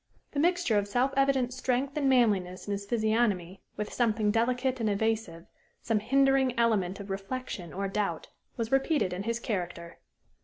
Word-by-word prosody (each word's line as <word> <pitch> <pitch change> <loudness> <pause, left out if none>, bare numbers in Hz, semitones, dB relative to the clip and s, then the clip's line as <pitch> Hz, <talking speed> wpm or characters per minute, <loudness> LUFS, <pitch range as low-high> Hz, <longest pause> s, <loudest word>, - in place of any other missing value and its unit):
The 285 - -2
mixture 345 - +2
of 205 - -3
self 250 +6 +1
evident 270 -2 +2
strength 260 +2 -1
and 285 -3 +1
manliness 200 -8 +2
in - - -2
his 200 0 -3
physiognomy 215 -5 0 0.2
with 210 0 -4
something 220 -3 +1
delicate 250 +3 0
and 220 -2 +1
evasive, 205 -5 -1 0.4
some 225 -2 +1
hindering 270 +2 +2
element 210 -6 +1
of 200 -1 -7
reflection 195 -2 -5
or 195 +1 -3
doubt, 195 -4 -2 0.3
was 230 -1 -3
repeated 270 - +2
in 180 - -4
his 230 +3 -2
character. 175 -6 -4
225 Hz, 160 wpm, -29 LUFS, 195-255 Hz, 0.4 s, mixture